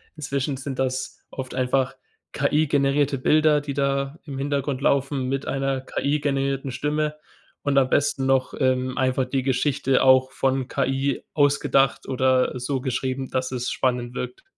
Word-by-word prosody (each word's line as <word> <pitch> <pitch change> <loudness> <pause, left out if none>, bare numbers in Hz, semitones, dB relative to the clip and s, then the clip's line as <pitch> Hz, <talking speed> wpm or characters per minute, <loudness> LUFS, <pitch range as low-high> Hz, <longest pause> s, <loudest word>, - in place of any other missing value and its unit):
inzwischen 140 -2 -2
sind 135 0 -6
das 130 0 -2
oft 130 -1 -6
einfach 130 +1 0 0.4
KI-generierte 145 -1 +2
Bilder, 150 +2 +3
die 145 -1 -5
da 140 +2 -1
im 140 -3 -6
Hintergrund 140 -1 -2
laufen 140 -1 +1
mit 135 +1 -2
einer 135 -1 -1
KI-generierten 140 -1 -1
Stimme 150 +3 -1 0.5
und 140 -1 +1
am 130 -1 +4
besten 140 -1 +1
noch, 135 -1 +1
ähm, 130 -1 +1
einfach 130 0 +1
die 130 +1 -1
Geschichte 135 +1 +1
auch 130 0 +5
von 135 -1 0
KI 135 +1 -1
ausgedacht 140 -3 +2
oder 130 -1 +1
so 130 +1 -2
geschrieben, 130 0 -2
dass 130 0 -2
es 125 -1 -2
spannend 125 -1 -1
wirkt. 380 - -5
135 Hz, 145 wpm, -24 LUFS, 130-140 Hz, 0.5 s, auch